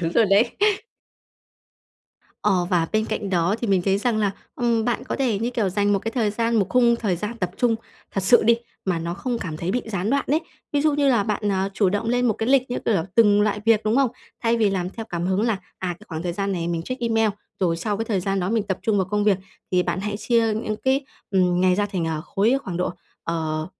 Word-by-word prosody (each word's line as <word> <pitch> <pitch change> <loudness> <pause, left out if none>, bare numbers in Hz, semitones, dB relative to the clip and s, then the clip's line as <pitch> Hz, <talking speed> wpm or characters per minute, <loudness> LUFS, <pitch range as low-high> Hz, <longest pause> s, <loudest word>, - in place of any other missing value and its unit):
Đúng 165 -1 -1
rồi 230 - +5
đấy. 200 +4 +3 1.9
Ờ, 190 -4 +2
và 170 -3 +2
bên 215 0 +2
cạnh 205 -2 -3
đó 175 +1 +2
thì 235 - -1
mình 195 -3 +2
thấy 195 +1 +2
rằng 230 0 0
là, 205 -2 +2 0.2
ừm, 235 -2 +1
bạn 240 -1 -1
có - - -3
thể, 245 -7 +1
như 230 +3 -1
kiểu, 230 -5 0
dành 205 +2 +1
một 200 - +3
cái 225 - -4
thời 225 -5 +1
gian, 230 +2 0
một 200 -3 +3
khung 240 0 +4
thời 205 -6 -1
gian 210 +6 -4
tập 180 -4 -1
trung 235 -2 +2 0.3
thật 195 - -1
sự 240 +6 +5
đi, 230 +2 +5 0.3
mà 180 -3 0
nó 170 +1 -3
không 240 +5 -3
cảm 165 -7 -5
thấy 170 +3 -3
bị 245 +4 0
gián 200 0 -2
đoạn 280 0 +1
đấy. 305 +3 +3 0.3
Ví 290 - +2
dụ 305 +1 +3
như 285 -1 +2
là 235 -6 +4
bạn, 205 0 -1
à, 190 0 0
chủ 200 -2 +3
động 205 +4 -1
lên 245 +1 +2
một 230 - +3
cái 225 +4 -2
lịch, 265 -2 +3
như 245 - -1
kiểu 225 - +2
là, 165 - +1
từng 210 -2 +5
loại 210 0 0
việc, 225 -2 +4
đúng 215 +2 +2
không? 270 -4 +3 0.3
Thay 230 0 +2
vì 215 -3 +3
làm 185 -2 -2
theo 225 +2 -7
cảm 175 0 -2
hứng 190 +2 +1
là, 230 -1 +2 0.2
à, 185 - -3
cái - - -16
khoảng 160 -1 -4
thời 175 -1 -2
gian 195 +2 -2
này 170 -2 -2
mình 170 -1 -2
check 255 +8 -5
email, 225 -2 +2 0.3
rồi 170 -3 +2
sau 205 +5 -2
cái 225 - -2
thời 210 -4 0
gian 195 +1 -1
đó 180 +2 -1
mình 225 -2 +1
tập 190 -2 -3
trung 220 -2 +1
vào 190 -2 +1
công 210 0 +1
việc, 205 -3 +4 0.4
thì 180 0 +4
bạn 185 - -2
hãy 205 +1 -3
chia 225 0 +2
những 215 0 -2
cái, 265 +4 +1 0.3
ừm, 180 -2 +2
ngày 185 -1 +4
ra, 205 - +1
à, - - -2
thành 175 -4 -1 0.2
khối, 215 +8 +2
khoảng 185 -6 -4
độ, 180 - 0 0.3
ờ, 155 -2 -2
205 Hz, 265 wpm, -23 LUFS, 185-230 Hz, 1.9 s, rồi